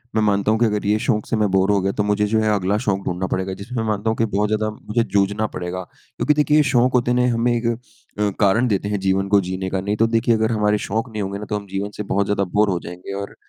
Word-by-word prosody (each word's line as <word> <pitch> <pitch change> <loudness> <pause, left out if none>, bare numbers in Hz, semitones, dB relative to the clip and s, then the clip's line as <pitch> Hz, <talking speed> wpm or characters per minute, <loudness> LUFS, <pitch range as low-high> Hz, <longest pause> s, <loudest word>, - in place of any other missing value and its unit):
मैं 110 - +3
मानता 100 0 +2
हूँ 110 - +1
कि 120 - +4
अगर 105 -2 -1
ये 105 +1 +3
शौक़ 110 -2 0
से - - +1
मैं 105 -1 +2
बोर 95 +1 +3
हो 100 - +3
गया 95 +1 0
तो 105 - 0
मुझे 105 0 +1
जो 110 +1 +2
है 110 -1 +2
अगला 100 0 +1
शौक़ 100 -2 +1
ढूँढ़ना 90 +1 -2
पड़ेगा, 95 0 -1
जिसमें 115 +5 -5
मैं 110 - -2
मानता 105 +1 -1
हूँ 110 - -1
कि 115 - +2
बहुत 105 -1 0
ज़्यादा 110 0 0
मुझे 110 +2 -2
जूझना 100 0 0
पड़ेगा। 90 -1 -5
क्योंकि 150 - -1
देखिए 150 0 +3
ये 150 - +5
शौक़ 130 -2 +2
होते 120 -1 +2
हैं 125 - +2
ना 120 - +1
हमें 115 +1 +1
एक 115 0 -2
अ, 115 -3 -4
कारण 110 +5 +3
देते 100 -3 0
हैं 105 -1 -1
जीवन 95 0 +1
को 100 0 +5
जीने 95 +1 -4
का। 95 - -1
नहीं 100 +2 -1
तो 115 - +3
देखिए 115 +1 +2
अगर 110 +1 +1
हमारे 105 -1 +2
शौक़ 115 +5 -2
नहीं 110 -1 -4
होंगे 100 0 -4
ना 105 - -6
तो 105 - -1
हम 100 -1 -9
जीवन 100 +1 -3
से 105 - -3
बहुत 100 0 0
ज़्यादा 100 0 0
बोर 105 0 +3
हो 90 -2 0
जाएँगे। 90 +3 -8
और 100 - -8
105 Hz, 295 wpm, -21 LUFS, 100-115 Hz, -, ये